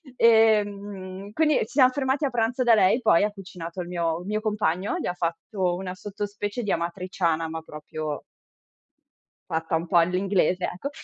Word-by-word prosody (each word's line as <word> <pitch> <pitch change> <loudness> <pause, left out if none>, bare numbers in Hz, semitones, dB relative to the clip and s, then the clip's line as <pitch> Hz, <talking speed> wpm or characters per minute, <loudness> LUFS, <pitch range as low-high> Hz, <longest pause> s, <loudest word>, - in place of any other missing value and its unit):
Ehm, 205 -4 +2
quindi 305 +2 +3
ci - - 0
siam 255 +1 +4
fermati 270 +2 0
a 275 - -1
pranzo 240 +2 0
da 235 -1 +5
lei, 205 +2 +4
poi 215 -7 +4
ha 210 - +1
cucinato 180 -3 -7
il 175 - -6
mio 170 -1 -1
mio 210 +2 -1
compagno, 210 -3 0
gli - - -4
ha 180 - -1
fatto 175 +2 -2
una 185 0 -5
sottospecie 205 +3 -5
di 205 - -1
amatriciana, 170 -1 -1
ma 160 0 -5
proprio 150 -1 -6 1.3
fatta 160 0 -1
un 165 +2 -2
po' 175 - +3
all'inglese, 185 +1 +2
ecco 180 +11 -4
190 Hz, 165 wpm, -25 LUFS, 170-215 Hz, 1.3 s, da